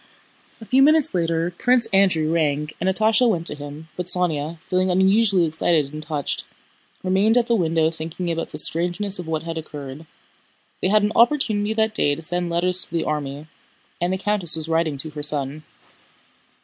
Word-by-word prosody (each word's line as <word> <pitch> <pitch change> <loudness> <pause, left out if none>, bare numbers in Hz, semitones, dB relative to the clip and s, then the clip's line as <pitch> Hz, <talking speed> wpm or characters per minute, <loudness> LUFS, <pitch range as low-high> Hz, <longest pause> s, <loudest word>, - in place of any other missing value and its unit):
A 220 - -11
few 260 +4 +3
minutes 305 +1 +4
later 165 0 -1
Prince 245 -1 +3
Andrew 170 -5 +3
rang 150 -2 0
and 185 - +1
Natásha 220 +5 +4
went 170 -6 -1
to - - +1
him, 145 +2 -9
but 180 -1 -5
Sónya, 165 -3 -1
feeling 185 0 0
unusually 190 0 +3
excited 155 -2 0
and 155 - -6
touched, 150 -2 -3 0.6
remained 195 +5 +2
at 240 - +3
the 235 - 0
window 165 -5 +1
thinking 165 +2 -5
about 165 0 -3
the - - -8
strangeness 175 +5 +1
of 175 - -7
what 160 -1 -2
had 165 -1 -4
occurred. 145 0 -9 0.7
They - - +1
had 210 +2 +3
an 210 - +1
opportunity 225 -5 +2
that 220 0 +1
day 145 -8 +1
to 160 - -9
send 175 +1 -1
letters 180 +2 +1
to - - -11
the 170 -1 -1
army, 145 -1 -4 0.6
and 175 +1 0
the 190 - -1
countess 190 -4 +1
was 160 -1 -4
writing 160 -3 0
to 155 +3 -5
her 150 0 -7
son. 145 0 -2
170 Hz, 185 wpm, -22 LUFS, 155-195 Hz, 0.7 s, minutes